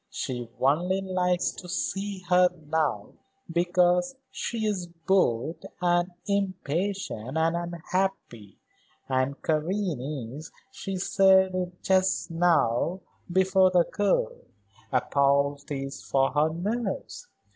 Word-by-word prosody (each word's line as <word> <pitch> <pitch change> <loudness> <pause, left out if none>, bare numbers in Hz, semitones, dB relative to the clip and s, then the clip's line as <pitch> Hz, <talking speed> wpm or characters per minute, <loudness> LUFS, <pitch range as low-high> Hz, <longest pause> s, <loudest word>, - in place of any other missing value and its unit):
She 120 -2 -4
only 175 +8 +2
likes 180 -2 0
to 180 - -10
see 195 +2 -3
her 180 +1 +5 0.2
now 150 -11 0 0.4
because 180 +4 +2 0.2
she 225 -2 -3
is 195 -4 -1
bored 165 -5 0 0.2
and 175 0 +2 0.2
impatient 190 - -2
and 165 +1 +2
unhappy, 170 - -3 0.5
and 130 +1 0
Karen 155 - -2
is 155 +3 -9 0.2
she 195 -7 -5
said 190 0 +4
it 180 -1 -4
just 190 -2 +2
now, 165 -1 +2 0.3
before 190 +1 +4
the 180 -2 +4
girl - - +1 0.6
a - - +3
poultice 140 0 0
for 135 -1 +1
her 150 +3 +2
nerves. 215 - -3
175 Hz, 105 wpm, -27 LUFS, 145-190 Hz, 0.6 s, her